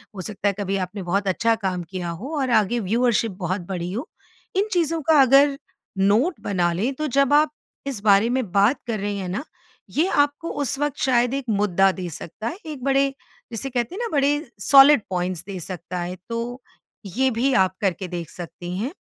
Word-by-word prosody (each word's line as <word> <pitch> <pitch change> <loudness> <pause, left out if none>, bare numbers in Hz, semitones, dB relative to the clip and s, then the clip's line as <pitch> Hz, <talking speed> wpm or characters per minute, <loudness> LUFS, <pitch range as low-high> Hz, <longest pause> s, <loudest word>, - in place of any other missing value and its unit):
हो 185 - -5
सकता 205 +2 -3
है 200 - +2
कभी 195 0 -1
आपने 190 +1 -4
बहुत 195 +3 -1
अच्छा 225 +4 +2
काम 180 -2 -1
किया 180 -2 -4
हो 250 - -5
और 260 -2 0
आगे 235 +4 -1
व्यूवरशिप 230 +1 +1
बहुत 185 +2 -2
बड़ी 180 -1 -3
हो। 245 +8 -4 0.5
इन 400 +3 +2
चीज़ों 330 -2 +1
का 305 -3 +6
अगर 275 +2 +5 0.4
नोट 215 - +2
बना 175 -4 +1
लें 225 +10 -1
तो 305 +2 -2
जब 275 +1 +2
आप 300 0 +4 0.4
इस 245 -8 -4
बारे 205 +2 +5
में 245 -7 -1
बात 205 +8 +3
कर 220 -3 -2
रही 205 0 -2
हैं 185 -2 -4
ना, 205 +10 -3 0.5
ये 320 +5 +1
आपको 290 +3 +1
उस 270 +1 -2
वक़्त 290 -2 -1
शायद 245 -1 +2
एक 275 -1 -2
मुद्दा 195 -2 +3
दे 180 -2 -6
सकता 180 +7 -7
है, 325 - -4
एक 300 -5 -7
बड़े, 275 0 +2 0.4
जिसे 230 +4 -3
कहते 245 - -2
हैं - - -6
ना 465 - -2
बड़े 280 +1 +3 0.3
सॉलिड 275 +2 +7
पॉइंट्स 180 -1 -2
दे 195 -2 -5
सकता 180 +1 -6
है 175 +1 -4
तो 235 +2 -4 0.4
ये 255 +8 +1
भी 250 +4 +1
आप 190 -4 +3
करके 190 -1 -1
देख 170 -2 -5
सकती 175 0 -8
हैं। 235 +8 -2
220 Hz, 200 wpm, -23 LUFS, 185-275 Hz, 0.5 s, सॉलिड